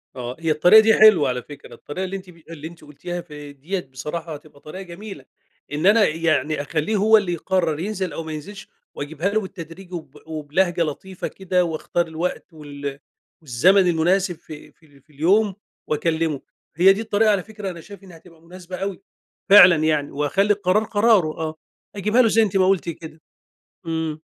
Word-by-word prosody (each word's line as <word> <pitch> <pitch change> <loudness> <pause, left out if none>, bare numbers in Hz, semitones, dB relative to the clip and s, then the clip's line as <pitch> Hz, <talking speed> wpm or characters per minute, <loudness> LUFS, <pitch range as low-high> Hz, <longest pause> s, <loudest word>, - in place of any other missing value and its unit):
آه، 125 0 -6
هي 165 -1 0
الطريقة 180 +8 +7
دي 220 0 +4
حلوة 215 -12 +6
على 125 0 -2
فكرة، 145 +3 -13
الطريقة 180 +6 -6
اللي 190 +1 -5
أنتِ 185 -1 -13
ب 170 - -16
اللي 160 -1 -8
أنتِ 170 -1 -14
قُلتيها 175 +4 -7
ف 170 -3 -15
دِيّة 150 +5 -6
بصراحة 155 +5 -6
هتبقى 150 -1 -13
طريقة 155 +6 -9
جميلة، 180 -4 -10 0.5
إن 150 +3 -2
أنا 210 +2 +6
يعني 155 -2 0
أخلّيه 155 +8 -2
هو 220 +2 +5
اللي 190 -4 -1
يقرّر 170 -2 -1
ينزِل 190 -3 -3
أو 165 - -5
ما 160 - -7
ينزِلش 175 +7 -8 0.3
وأجيبها 160 +6 -3
له 215 +1 0
بالتدريج 185 -1 -10
وب 155 -5 -8
وبلهجة 160 +3 -1
لطيفة 175 +4 -5
كده 185 -1 -1
واختار 165 +1 -2
الوقت 165 +2 -4
وال 145 -2 -7 0.4
والزمن 180 +8 +3
المناسب 175 +2 +1
في 155 -1 -12
في 145 -4 -24
في 150 +3 -27
اليوم 190 +7 +2 0.3
وأكلّمه، 160 -1 -1 0.3
هي 185 +4 +6
دي 205 - -4
الطريقة، 215 0 +2
على 195 -3 0
فكرة 210 -2 -7
أنا 170 -3 -8
شايف 200 +1 -13
إنها 180 -4 -13
هتبقى 165 0 -20
مناسبة 180 +2 -10
أوي 195 0 -4 0.5
فعلًا 185 -3 +9
يعني، 150 -2 0
وهاخلّي 190 +9 +1
القرار 200 +1 +1
قراره، 210 -6 +3
آه، 160 -1 -3 0.4
أجيبها 210 +5 +2
له 235 - +4
زي 225 +1 +3
أنتِ 200 -2 0
ما 185 -1 +3
قُلتِ 190 -3 +1
كده. 160 -1 -9 0.7
إمم. 160 -1 -3
170 Hz, 180 wpm, -22 LUFS, 155-195 Hz, 0.7 s, فعلًا